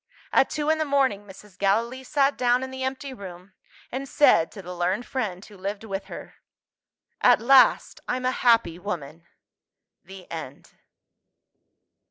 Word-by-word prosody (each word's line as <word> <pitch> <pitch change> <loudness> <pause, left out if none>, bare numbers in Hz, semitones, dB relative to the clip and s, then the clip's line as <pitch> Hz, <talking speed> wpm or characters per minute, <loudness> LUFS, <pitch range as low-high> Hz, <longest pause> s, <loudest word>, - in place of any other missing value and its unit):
At 270 - +4
two 305 0 0
in 315 - 0
the - - +2
morning, 270 -8 +1
Mrs. 195 0 -15
Gallilee 230 +6 0
sat 280 +1 +1
down 245 +1 +2
in 260 - -6
the 260 0 -7
empty 265 +1 -4
room, 190 -4 -11 0.4
and 270 +2 -5
said 225 - +4
to 195 - -10
the 180 +1 -7
learned 185 +7 -1
friend 205 -8 -4
who 210 - -15
lived 200 +2 -5
with 195 -2 -5
her, - - -10 0.8
"At - - +5
last, 265 +3 +4
I'm 255 0 -2
a 255 - +2
happy 230 -10 +2
woman!" 170 -4 -6 0.8
THE 190 -1 -12
END. 155 -4 -8
215 Hz, 155 wpm, -25 LUFS, 185-260 Hz, 0.8 s, At